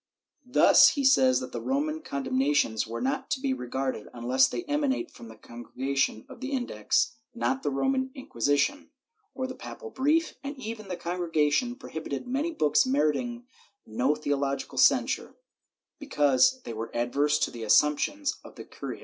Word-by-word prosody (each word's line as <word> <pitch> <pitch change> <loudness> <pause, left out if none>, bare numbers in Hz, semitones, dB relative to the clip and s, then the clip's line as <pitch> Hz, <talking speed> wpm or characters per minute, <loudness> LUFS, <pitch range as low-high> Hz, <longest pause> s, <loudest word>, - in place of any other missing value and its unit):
Thus 250 - +7
he 280 - -2
says 260 -1 +4
that 255 - -7
the - - -5
Roman 305 +4 -1
condemnations 135 - 0
were 115 - -5
not 265 0 -2
to 265 - -1
be 270 0 0
regarded 130 - -4
unless 125 +2 +3
they 355 - -4
emanate 295 0 -1
from 115 - -12
the 110 - -12
Congregation 120 +2 -3
of - - -13
the 270 +1 -4
Index 250 - 0 0.2
(not 265 +3 -1
the - - -1
Roman 260 - 0
Inquisition) 145 - -1 0.5
or 260 - -2
a 260 - -5
papal 450 - -9
brief, 310 +5 +1
and 280 +1 -6
even 225 -4 -7
the 180 -2 -4
Congregation 170 - 0
prohibited 160 - -6
many 280 +7 -1
books 150 - +3
meriting 155 - 0 0.4
no 125 +7 0
theological 140 -2 -2
censure, - - +2 0.6
because 150 - +2
they - - -6
were 110 +1 -5
adverse 140 +5 +1
to - - 0
the 120 - -9
assumptions 150 - +2
of - - -13
the - - -9
curia. - - -8
175 Hz, 160 wpm, -27 LUFS, -, 0.6 s, Thus